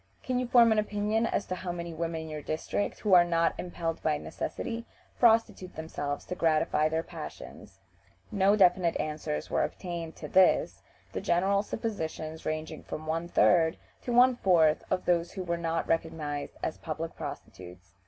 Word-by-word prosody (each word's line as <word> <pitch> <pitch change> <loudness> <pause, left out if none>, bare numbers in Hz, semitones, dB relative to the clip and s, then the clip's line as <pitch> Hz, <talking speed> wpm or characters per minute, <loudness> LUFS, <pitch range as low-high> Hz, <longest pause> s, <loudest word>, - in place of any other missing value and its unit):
"Can 255 -1 -1
you 250 - -2
form 235 -2 +6
an 220 - +3
opinion 210 +2 0
as - - -1
to - - -4
how 185 -1 -4
many 170 -1 -5
women 165 0 -3
in 160 - -8
your 155 -1 -5
district, 155 +7 -3
who 205 -3 +2
are 175 -1 +9
not 170 -1 +1
impelled 170 -2 -4
by 150 -1 +1
necessity, 230 - -5 0.4
prostitute 225 -6 +3
themselves 145 -2 -4
to - - -4
gratify 155 -2 +2
their 160 +1 -1
passions?" - - -10 0.5
No 200 -1 +4
definite 180 -3 +3
answers 150 - -3
were - - +2
obtained 170 -3 -5
to 150 - -7
this, 185 +4 +3 0.3
the - - -3
general 195 +3 +2
suppositions 160 -8 -5
ranging 155 0 -4
from 155 - -7
one 165 +2 -2
third 165 -2 +3 0.2
to 245 - -4
one 250 +1 +6
fourth 165 -7 +3
of 185 - -1
those 170 -1 +1
who 190 - -4
were 170 -1 -1
not 165 -1 -2
recognized 160 -3 -2
as 160 - -3
public 160 0 -5
prostitutes. 90 +1 -9
170 Hz, 170 wpm, -29 LUFS, 160-200 Hz, 0.5 s, are